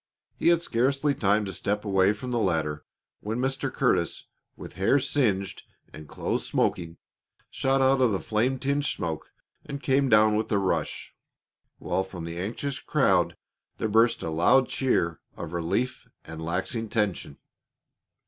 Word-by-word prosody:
He - - -1
had 170 0 +4
scarcely 135 +4 +1
time 105 -3 +1
to 95 - -5
step 105 +1 -2
away 95 -1 +3
from 115 +4 -5
the 120 - 0
ladder 80 -7 -1 0.4
when 110 +2 -4
Mr. 135 +1 -1
Curtis, - - 0 0.3
with - - -9
hair 100 +9 +3
singed 105 -9 0 0.3
and 75 -1 -11
clothes - - -2
smoking, 85 -2 -1 0.5
shot 135 0 +1
out 135 0 +3
of 125 -3 +4
the 95 - 0
flame 120 +5 0
tinged 140 +2 -1
smoke 80 - -3 0.3
and 140 - -6
came 135 0 +2
down 110 -1 +5
with 110 - -1
a 105 - +3
rush, 95 -2 -2 0.6
while 95 - -1
from 95 -3 -8
the 85 0 -6
anxious 125 +8 -3
crowd - - +2 0.4
there 110 - -1
burst 115 +3 +3
a 80 - -3
loud 105 +11 +4
cheer 85 - 0 0.2
of 80 - -6
relief 100 +10 -2 0.2
and 80 0 -8
laxing 95 +7 -2
tension. 105 - -1
105 Hz, 155 wpm, -26 LUFS, 95-130 Hz, 0.6 s, down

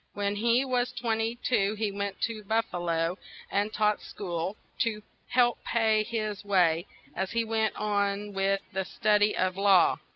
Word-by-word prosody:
When 205 0 -1
he 235 +4 +3
was 250 -1 0
twen 225 -2 -1
ty 225 +2 -1
two, 205 -4 +2
he 210 -1 -1
went 200 0 -4
to 225 -2 -2
Buf 225 +3 +1
fa 175 - -3
lo, 170 +1 -1 0.3
and 205 +2 0
taught 210 -1 +1
school, 180 0 -4 0.2
to 215 -2 0 0.2
help 240 -1 +2
pay 220 -2 +2
his 215 -2 -3
way, 180 -4 +2 0.3
as 190 0 -2
he 230 0 +1
went 220 -1 0
on 205 -1 -1
with 195 0 +1
the 190 0 -1
stud 210 +2 +1
y 210 +1 +3
of 185 0 0
law. 195 -3 +5
210 Hz, 175 wpm, -28 LUFS, 195-225 Hz, 0.3 s, law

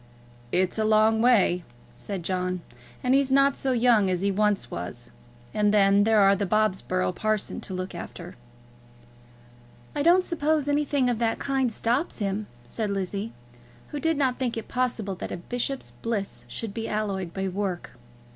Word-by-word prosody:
"It's 185 +3 +1
a - - +2
long 215 +1 +4
way," 205 -7 +4 0.3
said 190 +7 -6
John, 180 0 -1 0.4
"and 250 - +3
he's 270 -1 +3
not 275 0 +4
so 265 - -1
young 235 -5 +4
as 180 -1 0
he 200 0 +1
was 205 -9 +1
once; 90 +8 -5 0.4
and 210 -1 +2
then 200 -1 +5
there 220 -1 +4
are 195 0 +6
the 200 0 -2
Bobsborough 190 -3 +1
parsons 215 +2 -2
to 190 - -5
look 185 +1 -4
after." 175 0 -8 1.6
"I 290 - 0
don't 350 +4 +5
suppose 310 -4 0
anything 285 -2 +1
of 240 -2 0
that 230 -1 +1
kind 270 -3 0
stops 240 +9 -1
him," 205 0 -2 0.2
said 210 - -3
Lizzie, 200 +2 -3 0.6
who 295 - -4
did 325 0 +1
not 260 -3 +1
think 245 -3 -1
it 225 - -5
possible 240 -5 -1
that 180 - -6
a - - -3
bishop's 245 +8 -3
bliss 220 -4 -3
should 225 -3 -5
be 225 0 -4
alloyed 195 -4 -2
by 190 +2 -2
work. 190 -1 -3
215 Hz, 165 wpm, -26 LUFS, 195-250 Hz, 1.6 s, are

